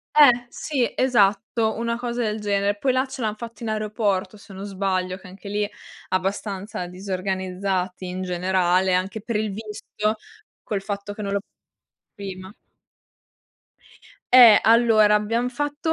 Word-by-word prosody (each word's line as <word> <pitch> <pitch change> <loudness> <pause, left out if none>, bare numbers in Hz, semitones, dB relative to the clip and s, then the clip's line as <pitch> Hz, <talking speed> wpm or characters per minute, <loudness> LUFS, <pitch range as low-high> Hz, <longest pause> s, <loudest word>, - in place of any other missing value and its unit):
Eh, 245 -5 +6
sì 265 -4 -1
esatto, 220 -2 +2
una 235 0 -1
cosa 240 0 -3
del 215 -1 -2
genere. 200 0 0
Poi 260 +5 +1
là 255 +1 +1
ce 265 -1 -8
l'han 215 -1 -2
fatto 235 0 -9
in 220 - -3
aeroporto, 215 -2 -1
se 205 - -15
non 195 +1 -7
sbaglio, 185 -2 -1
che 185 - -14
anche 195 +2 -12
lì 205 +1 0 0.4
abbastanza 195 +1 -2
disorganizzati 185 0 -3
in 185 +1 -4
generale 185 0 +1
anche 195 +4 -1
per 225 0 -2
il 210 -2 -2
visto, 215 0 -3 0.5
col 200 -2 -3
fatto 200 0 -5
che 210 - -8
non 200 -1 -3
l'ho 200 - +1 0.7
prima. 190 0 -8 1.8
Eh, 235 -5 +10
allora 220 -2 +5
abbiam 230 +4 0
fatto 290 +5 -2
205 Hz, 145 wpm, -23 LUFS, 190-230 Hz, 1.8 s, Eh